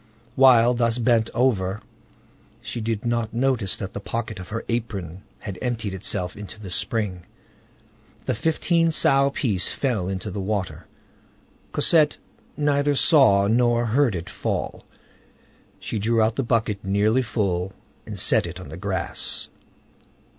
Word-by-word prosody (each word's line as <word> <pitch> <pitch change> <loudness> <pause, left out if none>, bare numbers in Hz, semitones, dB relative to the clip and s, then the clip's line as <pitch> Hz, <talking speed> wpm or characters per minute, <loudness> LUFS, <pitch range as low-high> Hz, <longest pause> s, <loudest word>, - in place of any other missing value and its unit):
While 125 -2 +6
thus 115 -1 +1
bent 115 -2 +2
over, 110 -5 +1 0.8
she 120 - -6
did 110 0 -2
not 115 -1 -1
notice 120 -6 +1
that 95 - -6
the - - -4
pocket 110 0 -4
of 90 0 -9
her 115 +2 -4
apron 100 -7 -4 0.2
had 95 -4 -7
emptied 115 -5 -2
itself 90 -1 -3
into 105 +1 -9
the 100 -4 -8
spring. 95 -3 -2 1.0
The - - 0
fifteen 165 - +1
sou 140 -3 +3
piece 105 -9 +1
fell 115 -10 -1
into 95 +2 -4
the 100 - -4
water. 100 -2 -3 0.8
Cosette 155 -3 +3 0.4
neither 145 -1 +2
saw 125 -10 +5
nor 120 +2 +2
heard 120 -1 +2
it 85 +1 -5
fall. - - -4 0.9
She 110 - -4
drew 115 +3 +1
out 110 +1 +2
the - - 0
bucket 110 -4 0
nearly 105 +5 +2
full, 95 -6 -1 0.4
and - - -6
set - - +2
it 85 +2 -8
on 90 - -10
the 80 - -8
grass. 95 0 -1
110 Hz, 140 wpm, -24 LUFS, 95-125 Hz, 1.0 s, While